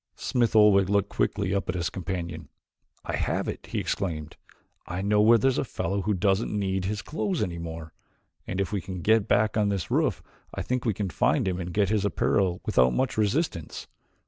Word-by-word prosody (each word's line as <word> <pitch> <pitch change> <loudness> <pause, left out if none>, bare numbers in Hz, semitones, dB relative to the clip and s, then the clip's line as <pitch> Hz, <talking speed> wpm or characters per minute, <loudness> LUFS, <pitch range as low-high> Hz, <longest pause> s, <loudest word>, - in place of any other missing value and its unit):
Smith 120 -3 0
Oldwick 100 -3 +6
looked 100 -1 +2
quickly 100 -1 -1
up 100 - -1
at - - -1
his 85 -1 -2
companion. 85 -4 -5 0.6
"I - - -2
have - - -1
it," - - -6
he - - -4
exclaimed. 80 -6 -3 0.5
"I 90 +2 -3
know 105 +1 +3
where 115 +2 +6
there 130 +5 +3
is 130 - 0
a - - +1
fellow 100 -5 -2
who 105 +2 0
doesn't 95 +3 +1
need 95 -2 -1
his 105 +1 -3
clothes 175 - -2
anymore, 85 -3 -6 0.5
and 95 - -3
if 100 - -1
we 100 -2 -1
can 95 -2 -6
get 110 -1 +3
back 110 0 +2
on 105 -1 +2
this 100 -5 -3
roof - - +1 0.3
I - - -3
think 125 0 -2
we 110 -4 +1
can 100 -3 -3
find 70 +6 +1
him 90 -1 -1
and 90 0 -4
get 100 +1 +1
his 105 -2 +1
apparel 95 -3 +1
without 65 0 +3
much 130 -1 0
resistance. 105 - -1
100 Hz, 200 wpm, -26 LUFS, 90-105 Hz, 0.6 s, Oldwick